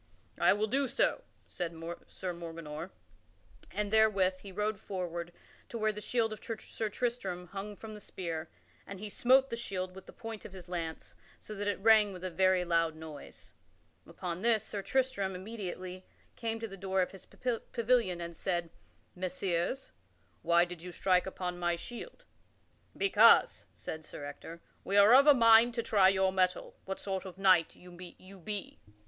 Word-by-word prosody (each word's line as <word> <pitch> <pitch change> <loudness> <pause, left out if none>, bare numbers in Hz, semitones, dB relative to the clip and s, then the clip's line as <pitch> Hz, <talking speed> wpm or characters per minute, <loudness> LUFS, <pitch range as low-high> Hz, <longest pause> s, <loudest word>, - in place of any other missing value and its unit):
"I - - +5
will 210 +1 0
do 270 +5 +1
so," 275 - +1 0.2
said 170 -2 -5 0.3
Sir 185 -2 -5
Morganor; 165 -1 -7 0.8
and 210 +1 -2
therewith 195 -4 +4
he 195 - -10
rode 210 +1 -1
forward 175 -3 -4 0.4
to 235 - -5
where 215 -1 +1
the 210 0 -7
shield 225 0 0
of 215 - -11
Sir 225 -1 -4
Tristram 220 -6 -3
hung 200 +1 -6
from 220 +1 -9
the 210 - -10
spear, 165 -4 -5 0.4
and 195 -1 -8
he 210 +1 -5
smote 260 +5 +4
the - - -1
shield 185 -5 -4
with 190 0 -12
the - - -10
point 225 -2 -8
of - - -10
his 185 -2 -10
lance, 165 -2 -5 0.2
so 215 - -9
that 205 0 -3
it 205 - 0
rang 215 -2 +6
with 180 0 -9
a 185 - -3
very 185 0 +3
loud 165 -2 +1
noise. 155 -2 -10 0.5
Upon 175 -1 -5
this, 225 -1 +3
Sir 205 -2 -5
Tristram 200 -6 0
immediately 185 -2 -6 0.3
came 225 -1 -3
to 225 - -4
the 195 -2 -10
door 190 0 +1
of - - -5
his 195 - -13
pavilion, 235 -5 0
and 170 0 -6
said, 175 -2 -2 0.4
"Messires, 185 +5 -2 0.5
why 170 0 +4
did 175 -2 -9
you 180 +1 -7
strike 180 +1 +2
upon 180 -1 -4
my 175 -1 +1
shield?" 370 - -9 0.7
"Because," 395 - +5
said 160 0 -6
Sir 145 -1 -8
Ector, 165 +3 -9 0.2
"we 200 - 0
are 205 +3 +8
of 275 +3 +7
a 295 - +9
mind 230 0 +6
to 235 - -1
try 200 -4 +5
your 190 0 +2
mettle 185 -1 0
what 190 0 -4
sort 190 -1 -3
of 185 -2 -9
a - - -12
knight 185 -4 +4
you 180 0 -14 0.5
be." 205 +2 -5
190 Hz, 175 wpm, -32 LUFS, 180-220 Hz, 0.8 s, a